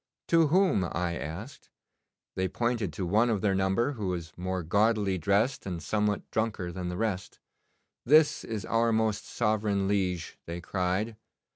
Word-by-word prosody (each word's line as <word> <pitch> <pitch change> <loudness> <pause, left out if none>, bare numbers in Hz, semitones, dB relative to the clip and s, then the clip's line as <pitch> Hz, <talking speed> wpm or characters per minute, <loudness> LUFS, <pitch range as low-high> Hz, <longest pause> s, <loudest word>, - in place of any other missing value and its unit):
"To 165 -2 +5
whom?" 175 - +3
I 85 0 -2
asked. 95 - -7 0.6
They 95 0 0
pointed 115 -2 -1
to 90 - -3
one 110 +7 +3
of 105 -4 0
their 100 -2 +2
number 95 +7 +1
who 110 -8 -4
was 85 -3 -4
more 90 0 -3
gaudily 100 +1 +2
dressed 100 - +1
and 90 -3 -3
somewhat 105 +2 -1
drunker 105 -5 -1
than 90 0 -4
the 90 - -4
rest. 105 -4 -3 0.6
"This 150 +3 +5
is 110 -3 -4
our 115 0 +2
most 110 -1 0
sovereign 105 -3 0
liege," 95 -4 -1
they 85 +1 -4
cried. 95 +5 -1
100 Hz, 155 wpm, -29 LUFS, 90-115 Hz, 0.6 s, To